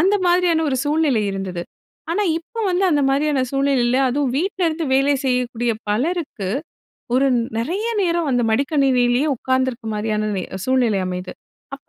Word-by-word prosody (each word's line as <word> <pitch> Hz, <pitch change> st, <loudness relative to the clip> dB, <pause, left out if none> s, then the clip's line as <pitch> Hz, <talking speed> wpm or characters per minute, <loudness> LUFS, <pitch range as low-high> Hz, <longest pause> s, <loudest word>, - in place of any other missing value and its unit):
அந்த 385 Hz, +4 st, +3 dB
மாதிரியான 350 Hz, -2 st, +3 dB
ஒரு 260 Hz, -, 0 dB
சூழ்நிலை 290 Hz, -7 st, +2 dB
இருந்தது. 185 Hz, -3 st, -4 dB, 0.5 s
ஆனா 415 Hz, -, +1 dB, 0.2 s
இப்போ 455 Hz, +8 st, -8 dB
வந்து 365 Hz, +2 st, +1 dB
அந்த 290 Hz, -2 st, +2 dB
மாதிரியான 285 Hz, -1 st, +1 dB
சூழ்நிலையில, 270 Hz, -3 st, +1 dB
அதுவும் 270 Hz, 0 st, 0 dB
வீட்லருந்து 340 Hz, -2 st, -1 dB
வேலை 275 Hz, +2 st, +3 dB
செய்யக்கூடிய 245 Hz, -2 st, 0 dB, 0.2 s
பலருக்கு, 260 Hz, -, -1 dB, 0.7 s
ஒரு 270 Hz, +2 st, +3 dB, 0.3 s
நிறைய 360 Hz, -, -2 dB, 0.2 s
நேரம் 340 Hz, -3 st, 0 dB
அந்த 245 Hz, -1 st, +2 dB
மடிக்கணினிலேயே 265 Hz, 0 st, +2 dB
உட்காந்திருக்க 260 Hz, -1 st, -1 dB
மாதிரியான 215 Hz, 0 st, -1 dB
நே 185 Hz, -, -2 dB, 0.2 s
சூழ்நிலை 245 Hz, -6 st, +2 dB
அமையுது. 180 Hz, 0 st, -5 dB, 0.4 s
அப்ப 275 Hz, -, -17 dB
270 Hz, 135 wpm, -20 LUFS, 240-320 Hz, 0.7 s, அந்த